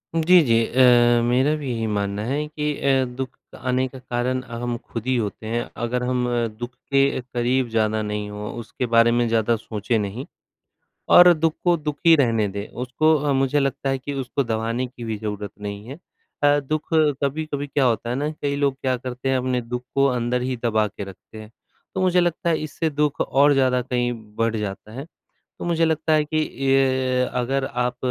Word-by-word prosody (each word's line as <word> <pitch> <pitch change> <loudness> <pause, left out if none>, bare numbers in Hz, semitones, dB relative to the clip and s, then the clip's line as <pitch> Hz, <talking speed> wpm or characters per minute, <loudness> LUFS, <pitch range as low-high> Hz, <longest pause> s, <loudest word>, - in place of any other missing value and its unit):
जी, 170 +2 +6
जी 115 -4 +2
अ, 120 -2 +5
मेरा 130 +5 +2
भी 145 -4 -5
यही 115 -1 -2
मानना 100 0 -2
है 145 +5 -1
कि 150 -1 -2
अ, 135 -1 +3
दुख 130 +1 -6 0.2
आने 130 +1 0
का 130 0 -11
कारण 125 +1 -2
हम 120 0 -4
खुद 115 -1 -8
ही 130 - +2
होते 110 0 -4
हैं। 120 +1 -1 0.2
अगर 125 +1 -1
हम 125 0 0 0.3
दुख 120 +1 -5 0.2
के 140 -1 +3
करीब 125 0 -1
ज़्यादा 110 -1 +1
नहीं, 105 -1 -3
हों 105 0 -6
उसके 125 +2 -4
बारे 115 0 +6
में 120 0 +2
ज़्यादा 115 0 +2
सोचे 110 0 -2
नहीं, 105 +6 -4 0.8
और 175 0 +9
दुख 160 0 0
को 175 -1 +4
दुख 150 -2 -4
ही 165 - +8
रहने 115 -7 +2
दें, 100 +1 -5
उसको 135 +6 +1
अ, 145 0 -1
मुझे 135 +2 +2
लगता 135 0 -1
है 135 - +1
कि 145 +2 -5
उसको 135 0 -2
दबाने 115 +2 -2
की 125 -1 -11
भी 110 -2 -3
ज़रूरत 105 -1 -5
नहीं 100 +1 -6
है। 140 +6 -8 0.4
अ, 145 0 +5
दुख 150 +2 -3
कभी-कभी 145 -1 0
क्या 140 -1 +1
होता 120 0 0
है 125 - -1
ना, 145 +3 -1
कई 140 -1 -1
लोग 140 -1 +1
क्या 130 -1 +1
करते 125 +1 -5
हैं, 130 - +2
अपने 125 -1 -1
दुख 125 +1 -5
को 140 0 +4
अंदर 125 -1 0
ही 125 0 -2
दबा 110 -2 +2
के 100 0 -8
रखते 100 +3 -11
हैं। 110 0 -13 0.4
तो 190 - 0
मुझे 180 -1 +3
लगता 170 0 0
है, 160 - +1
इससे 155 +2 -2
दुख 150 -1 0
और 140 +2 +4
ज़्यादा 130 -2 +2
कहीं 120 -1 -1 0.2
बढ़ 115 0 0
जाता 105 0 -5
है। 135 +6 -7 0.5
तो - - -6
मुझे 165 -1 +1
लगता 160 0 0
है 155 -1 +4
कि 155 +1 0
इ 130 -2 +1 0.2
अगर 135 +1 0
आप 125 0 -2
125 Hz, 200 wpm, -23 LUFS, 115-140 Hz, 0.8 s, और